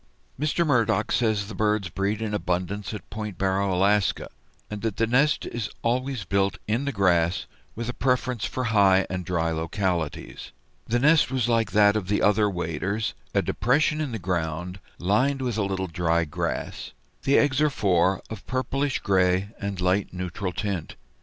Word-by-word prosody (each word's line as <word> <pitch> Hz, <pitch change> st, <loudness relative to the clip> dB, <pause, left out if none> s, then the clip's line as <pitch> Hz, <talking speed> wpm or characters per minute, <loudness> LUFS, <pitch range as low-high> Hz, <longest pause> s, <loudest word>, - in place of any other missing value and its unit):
Mr. 155 Hz, +3 st, +1 dB
Murdock 115 Hz, -6 st, +2 dB
says 110 Hz, -4 st, +1 dB
the 110 Hz, -, -7 dB
birds 105 Hz, -1 st, 0 dB
breed 100 Hz, +4 st, -1 dB
in 105 Hz, -1 st, -3 dB
abundance 95 Hz, +1 st, -2 dB
at 105 Hz, -, -7 dB
Point 105 Hz, -3 st, -5 dB
Barrow, 95 Hz, 0 st, +1 dB
Alaska, 100 Hz, +2 st, +2 dB, 0.4 s
and 105 Hz, -1 st, -6 dB
that 115 Hz, -3 st, -2 dB
the 115 Hz, -, +3 dB
nest 135 Hz, +6 st, +2 dB
is 120 Hz, -4 st, -4 dB
always 125 Hz, 0 st, -1 dB
built 100 Hz, +2 st, +1 dB
in 115 Hz, +6 st, 0 dB
the 140 Hz, -, 0 dB
grass, 90 Hz, -5 st, +2 dB, 0.3 s
with 115 Hz, +1 st, -4 dB
a 125 Hz, -, -2 dB
preference 125 Hz, -2 st, 0 dB
for 130 Hz, -, -2 dB
high 95 Hz, -2 st, +5 dB
and 90 Hz, 0 st, -3 dB
dry 85 Hz, -2 st, 0 dB
localities. 85 Hz, 0 st, -3 dB, 0.3 s
The 120 Hz, -, +1 dB
nest 150 Hz, +4 st, +4 dB
was 130 Hz, -3 st, 0 dB
like 115 Hz, -2 st, +2 dB
that 105 Hz, -1 st, +5 dB
of 105 Hz, -4 st, -2 dB
the 105 Hz, +1 st, +1 dB
other 105 Hz, 0 st, +4 dB
waders, 90 Hz, +3 st, -2 dB, 0.2 s
a -, -, +3 dB
depression 145 Hz, -, +1 dB
in 145 Hz, -4 st, -2 dB
the 115 Hz, -, -3 dB
ground, 90 Hz, 0 st, -3 dB, 0.2 s
lined 125 Hz, +10 st, +1 dB
with 120 Hz, -4 st, -1 dB
a -, -, +2 dB
little 95 Hz, -1 st, -2 dB
dry 85 Hz, -1 st, 0 dB
grass. 75 Hz, -, -4 dB, 0.3 s
The 140 Hz, -, +3 dB
eggs 145 Hz, -1 st, +3 dB
are 150 Hz, -, +4 dB
four, 95 Hz, -7 st, +1 dB
of 110 Hz, -, -7 dB
pale 130 Hz, 0 st, 0 dB
purplish 135 Hz, +1 st, -1 dB
gray 95 Hz, 0 st, +2 dB
and 100 Hz, -2 st, -4 dB
light 95 Hz, +2 st, +1 dB
neutral 90 Hz, +1 st, -4 dB
tint. 95 Hz, -3 st, -3 dB
100 Hz, 175 wpm, -25 LUFS, 90-120 Hz, 0.4 s, high